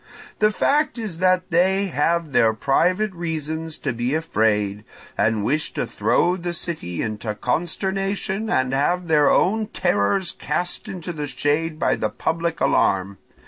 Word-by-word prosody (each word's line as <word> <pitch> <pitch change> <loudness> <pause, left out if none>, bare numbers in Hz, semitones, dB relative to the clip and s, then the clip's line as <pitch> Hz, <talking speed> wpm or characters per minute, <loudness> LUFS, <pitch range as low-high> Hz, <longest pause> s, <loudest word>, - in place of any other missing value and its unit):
The 210 - +5
fact 290 +6 +1
is 210 -8 -4
that 185 0 +2
they 190 +3 +3
have 165 +1 0
their 110 -4 +4
private 180 - +1
reasons 160 -2 -4
to 130 - -3
be 120 +4 -1
afraid, 105 -9 0 0.3
and 105 0 +1
wish 155 +6 0
to - - -1
throw 175 +1 +1
the 175 -1 -4
city 155 - -3
into 110 0 -4
consternation 190 - -1
to - - 0 0.2
have 170 +6 0
their 150 -3 +4
own 215 +3 +2
terrors 100 - 0
cast 175 0 -3
into 180 -2 -6
the 150 -2 -4
shade 155 +3 -1
by - - +1
the - - -1
public 170 0 -2
alarm. 95 0 +1
165 Hz, 145 wpm, -22 LUFS, 130-185 Hz, 0.3 s, The